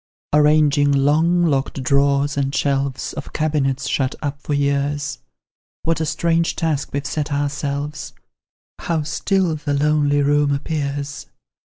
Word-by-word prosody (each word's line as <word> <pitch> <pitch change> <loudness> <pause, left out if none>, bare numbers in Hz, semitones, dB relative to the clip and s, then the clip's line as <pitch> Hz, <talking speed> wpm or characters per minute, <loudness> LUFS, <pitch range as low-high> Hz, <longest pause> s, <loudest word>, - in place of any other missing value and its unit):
Arranging 150 -1 +4
long 155 +5 +3
locked 135 -3 -1
drawers 140 +1 +2
and 140 0 -1
shelves 140 -1 -1
Of - - -8
cabinets, 140 -4 0
shut 130 0 0
up 145 -1 -4
for 145 - -2
years, 140 0 -1 0.6
What 165 0 0
a 160 - -1
strange 165 +2 +1
task 155 -4 -1
we've 140 0 -3
set 150 -1 -3
ourselves! 145 +1 -3 0.7
How 165 -3 -1
still 165 +3 0
the 145 -1 -2
lonely 145 0 +2
room 145 0 +2
appears! 140 -1 -4
145 Hz, 130 wpm, -20 LUFS, 140-155 Hz, 0.7 s, Arranging